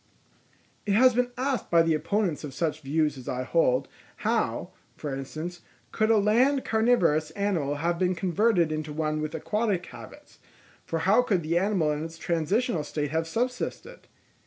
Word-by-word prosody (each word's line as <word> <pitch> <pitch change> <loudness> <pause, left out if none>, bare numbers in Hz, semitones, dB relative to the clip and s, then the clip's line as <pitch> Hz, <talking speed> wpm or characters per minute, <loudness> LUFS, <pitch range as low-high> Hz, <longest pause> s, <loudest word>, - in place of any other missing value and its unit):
_—It 200 - +2
has 255 +3 +6
been 250 +1 +1
asked 265 0 -1
by 170 -1 +5
the 165 -1 +2
opponents 180 0 -1
of 140 -3 -7
such 155 +1 -1
views 150 0 0
as 125 - -8
I 125 0 -2
hold, 130 -3 +2 0.4
how, - - 0 0.2
for 145 -2 -5
instance, 155 +6 -6 0.3
could 215 0 +1
a 225 - +5
land 245 +7 +3
carnivorous 200 -10 +2
animal 180 -9 0
have 170 +3 -1
been 185 0 +1
converted 180 0 +2
into 155 -1 -3
one 155 0 -1
with 155 +1 -4
aquatic 205 +2 -1
habits; - - -13 0.4
for 165 - -3
how 205 +6 +5
could 195 -8 0
the 165 +2 +1
animal 185 -6 +1
in 150 +1 -2
its 165 0 -8
transitional 170 +4 0
state 145 -1 -3
have 160 +1 -1
subsisted? 250 - -4
170 Hz, 165 wpm, -27 LUFS, 155-215 Hz, 0.4 s, has